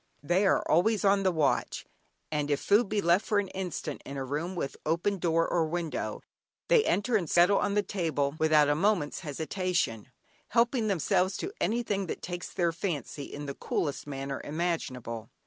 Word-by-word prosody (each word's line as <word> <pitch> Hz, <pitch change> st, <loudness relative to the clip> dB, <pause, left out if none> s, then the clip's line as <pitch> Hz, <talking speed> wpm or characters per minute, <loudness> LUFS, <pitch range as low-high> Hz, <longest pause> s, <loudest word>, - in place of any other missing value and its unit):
They 180 Hz, +7 st, +2 dB
are -, -, +2 dB
always 205 Hz, +6 st, +3 dB
on 195 Hz, 0 st, +4 dB
the 190 Hz, -1 st, +2 dB
watch, 160 Hz, -4 st, 0 dB, 0.5 s
and 150 Hz, -1 st, -1 dB
if 145 Hz, -1 st, +1 dB
food 205 Hz, +1 st, +3 dB
be 210 Hz, -1 st, +1 dB
left 170 Hz, +3 st, +3 dB
for 210 Hz, -, 0 dB
an 200 Hz, -2 st, 0 dB
instant 180 Hz, -6 st, -4 dB
in 140 Hz, -, -7 dB
a 135 Hz, -, -3 dB
room 155 Hz, +7 st, -3 dB
with 140 Hz, -6 st, -3 dB
open 175 Hz, +5 st, 0 dB
door 165 Hz, -1 st, +2 dB
or 165 Hz, -2 st, +1 dB
window, 165 Hz, -1 st, -3 dB, 0.5 s
they -, -, +6 dB
enter, 220 Hz, +4 st, +1 dB
and 175 Hz, -7 st, +1 dB
settle 180 Hz, +3 st, +5 dB
on 205 Hz, 0 st, 0 dB
the 205 Hz, -, +3 dB
table 160 Hz, -8 st, -1 dB
without 155 Hz, -2 st, +5 dB
a 145 Hz, -, +3 dB
moment's 175 Hz, -2 st, +1 dB
hesitation, 160 Hz, -, -2 dB, 0.4 s
helping 235 Hz, 0 st, +2 dB
themselves 185 Hz, 0 st, +1 dB
to 390 Hz, -, -4 dB
anything 210 Hz, -4 st, 0 dB
that -, -, -5 dB
takes 175 Hz, 0 st, -5 dB
their 175 Hz, -3 st, +1 dB
fancy, 155 Hz, -, -4 dB
in 145 Hz, 0 st, -7 dB
the 140 Hz, -, -4 dB
coolest 145 Hz, +1 st, -3 dB
manner 135 Hz, -1 st, -4 dB
imaginable. 130 Hz, -9 st, -3 dB
175 Hz, 180 wpm, -29 LUFS, 150-200 Hz, 0.5 s, they